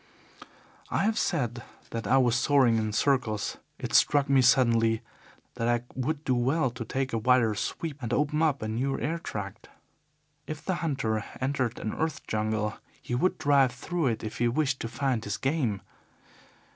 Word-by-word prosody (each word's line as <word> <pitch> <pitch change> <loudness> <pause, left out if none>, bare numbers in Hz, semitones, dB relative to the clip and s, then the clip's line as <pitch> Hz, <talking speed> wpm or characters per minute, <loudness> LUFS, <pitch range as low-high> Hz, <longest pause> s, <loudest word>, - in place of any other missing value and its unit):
"I - - +1
have 220 +1 +1
said 120 - -1 0.3
that 115 -3 -4
I 130 - +4
was 125 -3 +3
soaring 125 -2 +4
in 110 -1 -1
circles. 110 -2 0 0.2
It - - -5
struck 145 -1 +4
me 135 -1 +5
suddenly 115 -3 +3 0.5
that 115 -1 -2
I 120 0 +1
would 145 +4 -2
do 130 - +1
well 130 +3 +1
to 115 0 -6
take 130 +3 -3
a 115 - +1
wider 120 -1 +3
sweep 145 +7 -4
and 120 -2 -4
open 150 +4 +1
up 150 -7 +1
a - - -2
new 130 +5 -1
airtract. 110 -12 -4 0.8
If 155 0 -6
the 185 -2 0
hunter 130 -9 -1 0.2
entered 130 -3 -1
an 110 - -3
earth 160 -3 -3
jungle 110 0 -1 0.2
he - - -6
would 180 +10 +1
drive 140 -4 +3
through 165 +5 -2
it 115 -3 -1
if 110 - -6
he 120 - +3
wished 135 +2 0
to - - -3
find 130 -2 -1
his 105 -2 -3
game. 135 -8 0
125 Hz, 170 wpm, -28 LUFS, 115-145 Hz, 0.8 s, me